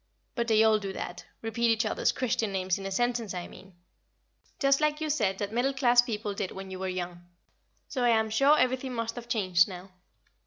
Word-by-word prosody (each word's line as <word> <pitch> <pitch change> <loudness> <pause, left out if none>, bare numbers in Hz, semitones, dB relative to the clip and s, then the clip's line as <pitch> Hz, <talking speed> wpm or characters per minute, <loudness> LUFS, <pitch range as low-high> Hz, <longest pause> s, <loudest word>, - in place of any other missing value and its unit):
But 235 -1 -2
they 220 -1 +4
all 220 -1 +4
do 200 -2 -5
that 175 - -6 0.2
repeat 230 +1 0
each 225 0 +2
other's 215 - +1
Christian 235 -4 -1
names 185 -1 -1
in 195 - -5
a - - -5
sentence, 235 -2 -1
I 180 - -5
mean 185 0 -15 0.8
just 275 +1 +3
like 300 0 +1
you 310 -1 -1
said 205 -10 0
that 205 +1 -4
middle 255 +4 +1
class 245 -2 +5
people 215 -3 -4
did 195 -1 -3
when 190 0 -8
you 185 - -6
were 190 - -3
young, 175 -1 -5 0.6
so 255 -3 -2
I 240 - +4
am 220 -1 +2
sure 275 +7 +5
everything 255 0 0
must 230 0 -2
have 240 0 -9
changed 185 -6 +3
now. 185 0 -9
220 Hz, 210 wpm, -28 LUFS, 190-245 Hz, 0.8 s, class